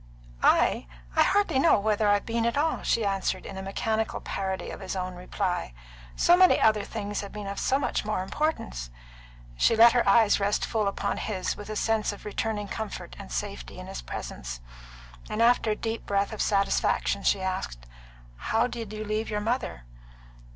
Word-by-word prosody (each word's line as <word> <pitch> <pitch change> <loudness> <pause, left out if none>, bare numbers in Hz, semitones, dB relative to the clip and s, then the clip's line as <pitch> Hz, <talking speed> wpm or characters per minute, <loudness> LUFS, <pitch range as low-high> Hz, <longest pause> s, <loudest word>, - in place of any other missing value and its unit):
"I? - - +3 0.3
I - - +5
hardly 405 -9 +3
know 300 -5 +5
whether 210 0 +1
I've 205 0 +3
been 230 0 0
at 235 - -1
all," 315 +2 +1
she 225 - +1
answered, 195 -1 -1
in 190 0 -6
mechanical 220 +3 -1
parody 190 -1 -3
of - - -8
his 190 0 -5
own 185 -1 -3
reply. 180 - -3 0.4
"So 350 - +5
many 370 0 +6
other 215 -2 +4
things 205 -2 -4
have 200 - -8
been 210 -1 -7
of 200 0 -4
so 265 - +2
much 280 - -1
more 210 -3 -1
importance." 190 - -2 0.7
She 230 - +4
let 230 +1 +8
her 240 -4 +2
eyes 215 0 +5
rest 205 +1 +1
full 215 -3 0
upon 200 - -1
his, 190 -4 -2
with 205 0 -9
a 215 - -4
sense 220 0 +1
of 205 - -11
returning 210 0 -2
comfort 205 - -6
and 60 - -9
safety - - -5
in - - -8
his - - -6
presence, - - -6 0.7
and 215 - -3
after 230 -1 +4
a 210 - +1
deep 225 +1 -4
breath 200 +1 0
of 215 - -3
satisfaction, 200 -2 +1
she 200 - +2
asked, 125 - -4 0.5
"How 225 - +1
did 230 -4 -5
you 215 0 -5
leave 215 +1 -2
your 210 -1 -1
mother?" 225 - -2
210 Hz, 185 wpm, -27 LUFS, 195-225 Hz, 0.7 s, let